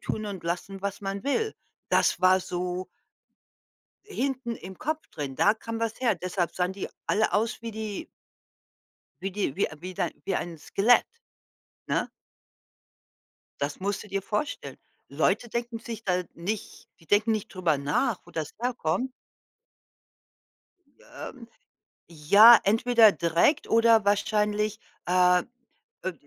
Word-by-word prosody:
tun 215 -1 -3
und 190 -4 -6
lassen, 190 +3 -4
was 200 0 -3
man 195 +1 -4
will. 435 +11 0 0.3
Das - - +2
war 185 0 +5
so 180 +1 -4 1.2
hinten 265 - -3
im 185 0 -10
Kopf 310 +2 -3
drin. 140 -3 -5
Da 205 - +4
kam 230 0 -6
was 225 -1 -2
her, 230 -6 +3
deshalb 180 0 -2
sahen 180 +1 -1
die 200 - -5 0.2
alle 215 +1 +2
aus 225 +3 0
wie 230 -1 -5
die 220 - -5 1.2
wie 195 0 -3
die 195 -8 -2
wie 200 - +2
äh, 155 - -12
wie 185 +1 -6
dein - - -1
wie 195 - 0
ein 170 -2 -4
Skelett, 220 +10 +3 0.8
ne? - - 0 1.5
Das 145 +3 -2
musst 200 +1 -2
du 210 - -13
dir 195 0 -2
vorstellen. 215 +9 -3 0.3
Leute 240 - +1
denken 235 0 -3
sich 225 -1 -7
da 180 -2 0
nicht 200 +5 -5
die 165 - -20
denken 215 +5 +3
nicht 215 0 -3
drüber 175 -6 +1
nach, 165 - 0
wo - - -15
das 155 -2 -4
herkommt 245 0 -1 2.0
Ähm, 240 -3 -8 0.6
ja, 200 +9 +8
entweder 225 +1 +5
direkt 170 - +2
oder 225 -1 +5
wahrscheinlich, 210 +1 +1 0.3
äh 180 0 +4 0.6
äh, 185 - -1
205 Hz, 135 wpm, -27 LUFS, 180-230 Hz, 2.0 s, ja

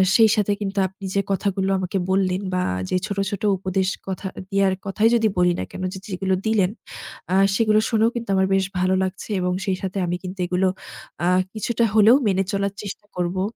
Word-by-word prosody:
সেই 225 -2 +6
সাথে 205 -1 +1
কিন্তু 200 0 -3
আপনি 190 +1 -11
যে 200 - +3
কথাগুলো 195 0 0
আমাকে 185 +1 -2
বললেন 190 -1 +1
বা 180 - +1 0.3
যে - - 0
ছোট, 200 -2 -4
ছোট 200 - -5
উপদেশ, 185 0 -1 0.2
কথা 190 +1 -4 0.2
দেয়ার 195 -1 +3
কথাই 210 +3 +2
যদি 225 -2 +3
বলি 180 0 +4
না - - -1
কেনো 185 - -5
যে, 190 - -6
যেগুলো 190 0 -1
দিলেন, 205 -4 +2 0.6
আ - - +1 0.2
সেগুলো 215 -1 +3
শুনেও 225 0 +3
কিন্তু 235 -3 -4
আমার 190 0 +3
বেশ 190 - +2
ভালো 185 +1 +2
লাগছে। 190 +3 -5
এবং 180 0 0
সেই 190 -2 0
সাথে 190 0 -4
আমি 175 - -1
কিন্তু 185 +1 -7
এগুলো 185 +1 +1 0.6
আ - - +2 0.3
কিছুটা 230 +2 -1
হলেও 220 +3 +7
মেনে 195 -1 +2
চলার 200 0 -1
চেষ্টা 205 +1 -7
করবো। 180 +1 -1
195 Hz, 195 wpm, -22 LUFS, 185-205 Hz, 0.6 s, হলেও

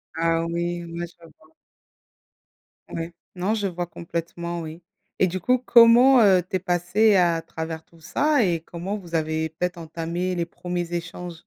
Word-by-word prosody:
Ah 165 0 +1
oui, 170 +1 -2
ouais 170 +1 -5
je 170 - -21 0.2
vois. 155 0 -24 1.4
Ouais, 165 +1 -5 0.2
non 185 +4 0
je 205 -3 -1
vois 175 -1 -3
complètement 170 0 -5
oui 160 +2 -8 0.4
et 185 - +4
du 185 +2 -3
coup 250 +7 +2
comment, 245 +2 +7
heu, 190 -3 +6
tu - - -2
es - - +2
passée 190 +4 +2
à 170 -3 +3
travers 160 0 -6
tout 165 - -22
ça? 290 - +2
Et 170 -4 0
comment 175 +5 -5
vous 175 -4 -12
avez 160 0 0
peut-être 175 +2 -3
entamé 170 +3 -3
les 170 -1 -2
1ers 175 0 -4
échanges? 170 0 -5
175 Hz, 165 wpm, -24 LUFS, 165-185 Hz, 1.4 s, comment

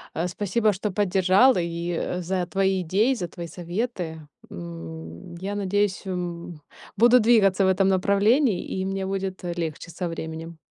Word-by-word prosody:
Э, 170 +2 0
спасибо, 205 +4 +1
что 205 +3 -3
поддержала, 195 +4 +4
и, 170 0 -3
э, 180 +1 -2
за 180 0 -2
твои 190 0 +1
идеи, 200 +10 +2
за 185 -9 -3
твои 170 0 -8
советы. 175 -2 -4 0.2
М, 85 - -8
я 195 +4 -4
надеюсь, 205 0 0
м, 175 -3 -5 0.4
буду 240 +2 +6
двигаться 205 -4 +4
в - - +3
этом 190 +1 +3
направлении 200 +4 +3
и 190 - -3
мне 195 0 -2
будет 190 -1 -3
легче 170 -1 -4
со 175 +2 -3
временем. 165 0 -6
185 Hz, 150 wpm, -25 LUFS, 170-200 Hz, 0.4 s, буду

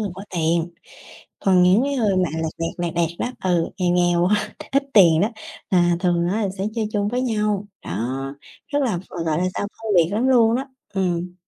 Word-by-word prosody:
người 205 -2 -2
có 190 - -8
tiền. 170 -1 0 0.7
Còn 185 -2 +4
những 185 +6 +5
cái 280 0 -1
người 210 -6 +1
mà 180 -4 +1
lẹt 160 -1 -2
đẹt, 165 0 -2
lẹt 175 -2 -2
đẹt 170 -1 +1
đó, - - -2
ừ, 175 -3 +1
nghèo 180 -2 +1
nghèo 175 -1 +3
á, 210 +2 0 0.2
ít 275 - +3
tiền 170 -6 +6
đó, 205 - +3 0.4
là 175 -2 +3
thường 175 -2 +1
á, 210 +5 0
là 200 - 0
sẽ 190 - -1
chơi 220 -2 -1
chung 205 -1 0
với 250 +3 -1
nhau. 210 -4 -1 0.2
Đó, 120 +8 -3 0.5
rất 290 0 0
là 235 -9 0
v - - -7 0.3
gọi 155 -1 +1
là 180 - 0
sao? - - -2
Phân 220 0 -5
biệt 165 -2 +5
lắm 240 +5 +1
luôn 235 -3 +4
á, 265 +2 -3 0.3
ừm. 180 -2 -1
185 Hz, 220 wpm, -22 LUFS, 170-215 Hz, 0.7 s, tiền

